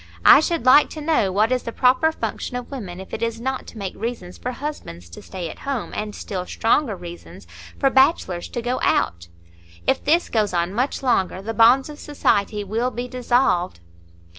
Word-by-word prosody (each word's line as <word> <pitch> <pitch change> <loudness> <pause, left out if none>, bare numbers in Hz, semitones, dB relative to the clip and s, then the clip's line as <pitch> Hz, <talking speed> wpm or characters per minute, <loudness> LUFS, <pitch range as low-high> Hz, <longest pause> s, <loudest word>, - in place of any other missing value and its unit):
I - - +10
should 320 -3 -1
like 260 +4 +7
to - - -4
know 295 -11 +1
what 215 +5 +2
is 255 -1 +1
the 230 - -6
proper 255 +7 +3
function 275 - -5
of 250 +2 -8
women, 195 -10 -7
if 190 - -11
it - - -4
is 230 0 -2
not 260 +2 -3
to - - -11
make 195 -3 -4
reasons 220 -6 -5
for - - -5
husbands 240 - -7
to - - -10
stay 185 -3 -6
at - - -9
home, 275 -5 -4
and 210 0 -4
still 185 -3 -5
stronger 225 0 +1
reasons 175 -1 -11 0.3
for 270 -1 +2
bachelors 265 - +2
to 240 - -5
go 250 +2 -1
out. 85 0 0 0.6
If - - +1
this 330 +4 +2
goes 210 -5 0
on 175 +2 0
much 255 +5 -1
longer, 195 -8 +1
the 225 +2 -4
bonds 240 +4 +5
of 300 -1 -10
society 210 -7 0
will 225 +5 -1
be 245 0 -5
dissolved." 245 - +1
230 Hz, 195 wpm, -22 LUFS, 190-265 Hz, 0.6 s, I